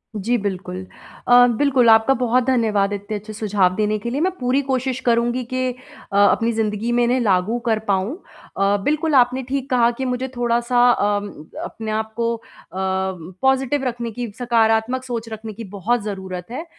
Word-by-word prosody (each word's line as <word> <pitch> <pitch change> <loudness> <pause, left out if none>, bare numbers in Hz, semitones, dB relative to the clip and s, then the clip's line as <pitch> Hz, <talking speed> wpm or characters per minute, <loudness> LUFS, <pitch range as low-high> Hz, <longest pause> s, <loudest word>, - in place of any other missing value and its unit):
जी, 225 +4 0
बिल्कुल। 185 -3 -4 0.4
अ, 245 0 +8
बिल्कुल 260 -4 +3
आपका 225 +4 +6
बहुत 250 0 +1
धन्यवाद 215 -6 +1
इतने 205 +1 -4
अच्छे 215 +1 -9
सुझाव 200 -4 +1
देने 215 +1 0
के 235 - -4
लिए 270 +5 -2
मैं 370 +3 +2
पूरी 255 +2 +1
कोशिश 260 -1 -1
करूँगी 240 +1 +1
कि 255 0 0
अ, 250 -5 -8
अपनी 205 +3 +4
ज़िंदगी 220 0 -1
में 240 0 +2
इन्हें 245 +2 +2
लागू 210 +1 +1
कर 220 -1 +2
पाऊँ। 195 +4 0 0.4
अ, 200 +1 +2
बिल्कुल 305 +2 +1
आपने 255 +1 +3
ठीक 275 0 -2
कहा 240 -3 +4
कि - - -1
मुझे 250 +1 -2
थोड़ा-सा 240 +1 +2
अ, 205 -3 +1 0.5
अपने 220 -1 -6
आप 220 0 -3
को 235 0 0
अ, 230 - -13 0.3
पॉजिटिव 190 - -1
रखने 235 -1 -4
की, 240 0 -5
सकारात्मक 235 +1 +2
सोच 235 -3 -5
रखने 220 0 -7
की 230 +3 -8 0.2
बहुत 240 +5 +1
ज़रूरत 190 -2 -6
है, 290 +7 -5
235 Hz, 175 wpm, -21 LUFS, 205-250 Hz, 0.5 s, अ